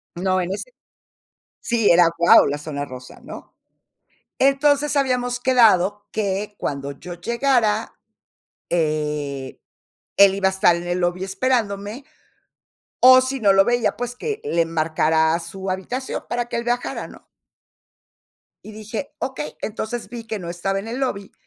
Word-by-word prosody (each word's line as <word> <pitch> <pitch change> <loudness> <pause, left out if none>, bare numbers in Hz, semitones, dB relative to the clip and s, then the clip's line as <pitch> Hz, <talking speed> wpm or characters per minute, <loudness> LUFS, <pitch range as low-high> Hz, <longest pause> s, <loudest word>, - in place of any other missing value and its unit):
No, 185 +1 0
en 180 +1 -3
ese 200 - -4 1.0
sí, 230 -3 +2
era 170 0 +6
guau, 170 0 +6
la 145 +1 -2
Zona 145 -1 -5
Rosa, 130 -2 -11
¿no? - - -11 0.8
Entonces 285 +2 +2
habíamos 250 -2 0
quedado 210 -6 +3
que 205 0 -2
cuando 140 0 -4
yo 175 +6 -9
llegara, 230 +2 0 0.8
eh, 150 -4 -2 0.6
él 200 -1 +7
iba 195 -1 +1
a - - -4
estar 190 -2 +3
en 170 - -5
el 175 +1 -1
lobby 175 +1 -1
esperándome, 205 +2 -2 0.9
o 255 0 +8
si 260 +1 -2
no 205 -4 +4
lo 195 0 +6
veía, 240 0 +1
pues, 245 0 -5
que 435 - -4
le 170 0 +1
marcara 160 0 +1
a 170 - 0
su 190 +2 -7
habitación 240 +8 -4
para 240 0 -3
que - - -2
él 235 - -4
bajara, 245 0 -2
¿no? - - -15 1.4
Y 215 - -10
dije: 215 +5 -7
"Okey", 155 - -5
entonces 220 +1 -4
vi 230 +1 -8
que 220 -1 -4
no 170 -3 -6
estaba 195 +3 -2
en 200 +3 -6
el 240 +3 -4
lobby, 200 -7 -3
200 Hz, 150 wpm, -21 LUFS, 170-240 Hz, 1.4 s, o